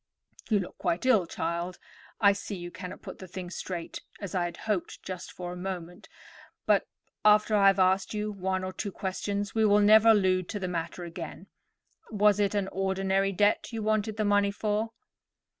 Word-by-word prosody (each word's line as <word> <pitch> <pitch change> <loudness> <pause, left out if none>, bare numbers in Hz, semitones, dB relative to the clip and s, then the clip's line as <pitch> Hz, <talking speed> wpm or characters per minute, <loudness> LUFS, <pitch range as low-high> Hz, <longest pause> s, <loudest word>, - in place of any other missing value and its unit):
"You 215 - +4
look 180 - -9
quite 170 +8 -1
ill, 220 -9 +4
child. 170 +2 -3 0.4
I 200 -1 +6
see 200 +1 -6
you 175 -1 -7
cannot 180 +1 -8
put - - -9
the 185 - -9
thing 180 0 -7
straight, 175 -3 -5 0.2
as 200 -4 -6
I 180 -2 +1
had 175 - -5
hoped 210 -5 -2
just 185 -2 -6
for 180 -1 -6
a - - -7
moment: 180 -1 -6 0.6
but, - - +3 0.4
after 210 +1 +5
I 200 -1 +5
have 195 - +5
asked 190 0 +3
you 210 0 -2
one 190 -1 -2
or 185 0 -4
two 200 +1 -4
questions, 200 +2 -3
we 220 - +2
will 205 -1 +5
never 215 +2 +7
allude 185 -4 +3
to 205 - -3
the 185 - -3
matter 170 0 -4
again. 170 +2 -8 0.6
Was 210 -1 +3
it 205 0 +1
an 200 -2 0
ordinary 195 0 0
debt 205 +5 +2
you 225 -2 -4
wanted 215 0 0
the 215 - 0
money 205 0 +3
for?" 210 +2 -1
195 Hz, 190 wpm, -28 LUFS, 180-210 Hz, 0.6 s, never